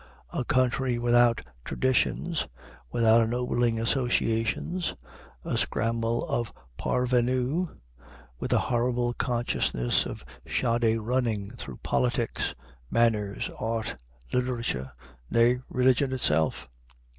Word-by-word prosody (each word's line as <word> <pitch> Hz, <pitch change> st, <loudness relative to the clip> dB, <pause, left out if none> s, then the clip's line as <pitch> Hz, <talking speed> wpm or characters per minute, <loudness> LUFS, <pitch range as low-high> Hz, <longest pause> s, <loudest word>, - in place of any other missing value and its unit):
A -, -, 0 dB
country 130 Hz, 0 st, +1 dB
without 120 Hz, 0 st, +4 dB, 0.2 s
traditions, 130 Hz, -, 0 dB, 0.4 s
without 115 Hz, +2 st, +5 dB
ennobling 120 Hz, 0 st, +1 dB
associations, 120 Hz, +6 st, 0 dB, 0.5 s
a -, -, 0 dB
scramble 115 Hz, +1 st, 0 dB
of 120 Hz, -3 st, -1 dB, 0.2 s
parvenus, 125 Hz, -, +1 dB, 0.7 s
with -, -, -3 dB
a -, -, +5 dB
horrible 120 Hz, 0 st, +1 dB
consciousness 120 Hz, -, 0 dB
of -, -, -8 dB, 0.2 s
shoddy 115 Hz, -1 st, +1 dB
running 110 Hz, -3 st, -1 dB
through 70 Hz, -, -8 dB
politics, 120 Hz, -2 st, 0 dB, 0.3 s
manners, 105 Hz, -2 st, +1 dB
art, 110 Hz, -5 st, -2 dB, 0.4 s
literature, 115 Hz, -, -1 dB, 0.4 s
nay, 120 Hz, +2 st, +4 dB
religion 130 Hz, +1 st, +3 dB
itself? 80 Hz, -, +1 dB
120 Hz, 90 wpm, -28 LUFS, 115-125 Hz, 0.7 s, without